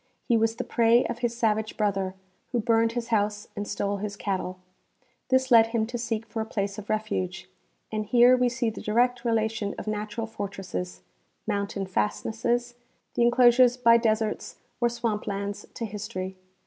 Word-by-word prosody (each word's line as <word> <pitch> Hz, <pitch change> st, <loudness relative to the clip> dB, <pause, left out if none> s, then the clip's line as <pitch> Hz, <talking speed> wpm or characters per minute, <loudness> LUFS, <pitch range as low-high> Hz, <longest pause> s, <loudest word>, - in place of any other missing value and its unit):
He 235 Hz, -, +4 dB
was 225 Hz, 0 st, +2 dB
the 250 Hz, -, -3 dB
prey 235 Hz, 0 st, +3 dB
of 235 Hz, -, -4 dB
his 235 Hz, -1 st, -1 dB
savage 220 Hz, -2 st, 0 dB
brother, 195 Hz, -3 st, 0 dB, 0.4 s
who 245 Hz, -, +1 dB
burned 230 Hz, 0 st, +2 dB
his 240 Hz, -1 st, -3 dB
house 210 Hz, -2 st, 0 dB
and 205 Hz, 0 st, -4 dB
stole 205 Hz, 0 st, -1 dB
his 205 Hz, 0 st, -4 dB
cattle. 185 Hz, -2 st, -3 dB, 0.7 s
This 260 Hz, 0 st, +2 dB
led 225 Hz, -1 st, +8 dB
him 225 Hz, -1 st, 0 dB
to 240 Hz, +2 st, -4 dB
seek 225 Hz, -1 st, -2 dB
for 225 Hz, 0 st, -4 dB
a -, -, -2 dB
place 200 Hz, -1 st, -2 dB
of 210 Hz, -, -11 dB
refuge, 200 Hz, -4 st, -2 dB, 0.4 s
and 215 Hz, -1 st, -2 dB
here 245 Hz, +3 st, +6 dB
we 250 Hz, -1 st, +2 dB
see 235 Hz, -1 st, -1 dB
the -, -, -8 dB
direct 240 Hz, +3 st, +1 dB
relation 220 Hz, -3 st, 0 dB
of -, -, -6 dB
natural 215 Hz, +1 st, -3 dB
fortresses, 185 Hz, -, -6 dB, 0.4 s
mountain 200 Hz, -2 st, -2 dB
fastnesses, 220 Hz, -, -1 dB, 0.4 s
the -, -, 0 dB
inclosures 240 Hz, +1 st, +5 dB
by 235 Hz, -2 st, +6 dB
deserts 220 Hz, -2 st, -1 dB, 0.2 s
or 240 Hz, -1 st, +3 dB
swamp 230 Hz, -3 st, -2 dB
lands, 200 Hz, 0 st, -4 dB
to 230 Hz, -, -3 dB
history. 200 Hz, -3 st, -5 dB
220 Hz, 170 wpm, -27 LUFS, 205-235 Hz, 0.7 s, led